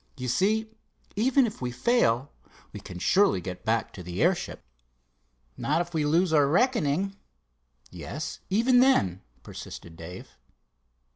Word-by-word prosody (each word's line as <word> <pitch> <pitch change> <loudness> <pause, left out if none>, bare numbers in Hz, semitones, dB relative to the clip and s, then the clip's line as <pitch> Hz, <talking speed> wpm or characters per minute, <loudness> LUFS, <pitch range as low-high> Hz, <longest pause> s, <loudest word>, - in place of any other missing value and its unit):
You 125 -1 -4
see, 210 - +1 0.5
even 255 +5 +3
if 215 - -6
we 125 - -2
fail, 130 - +1 0.4
we - - -7
can 90 - -9
surely 190 - +3
get 90 0 -7
back 115 -1 0
to 95 - -9
the 90 +1 -6
airship." 175 +1 0 0.9
"Not 155 +3 0
if 175 0 -3
we 155 -2 0
lose 165 +3 +2
our 145 -2 +5
reckoning." 195 - +1 0.8
"Yes, 155 +2 -6
even 235 +6 +4
then," 95 - +3 0.2
persisted 85 -1 -9
Dave. 85 +3 -11
160 Hz, 135 wpm, -27 LUFS, -, 0.9 s, our